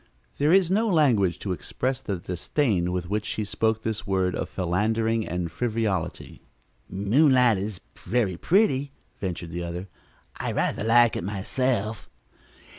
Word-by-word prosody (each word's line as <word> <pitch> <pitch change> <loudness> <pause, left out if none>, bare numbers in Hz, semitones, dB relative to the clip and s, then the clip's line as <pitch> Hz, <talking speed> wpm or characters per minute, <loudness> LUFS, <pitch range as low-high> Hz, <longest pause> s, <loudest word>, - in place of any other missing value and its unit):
There 150 +2 +3
is 185 -1 +4
no 220 +4 +2
language 125 - +3
to 100 - -3
express 130 +8 -2
the 100 - -3
disdain 90 - -1
with 90 -1 -2
which 105 +2 -1
she 110 - -3
spoke 110 +2 0
this 110 -1 -3
word 95 -2 +1
of - - -3
philandering 110 +5 0
and 85 0 -3
frivolity. 110 -7 -2 0.5
"Moonlight 120 - +4
is 100 -1 -5 0.2
very 110 -7 0
pretty," 145 - +2 0.3
ventured 90 -3 -4
the 85 +1 -4
other. 85 +3 -5 0.5
"I - - -3
rather - - 0
like 120 +1 +5
it - - -3
myself." 110 +3 -2
110 Hz, 140 wpm, -25 LUFS, 90-125 Hz, 0.5 s, like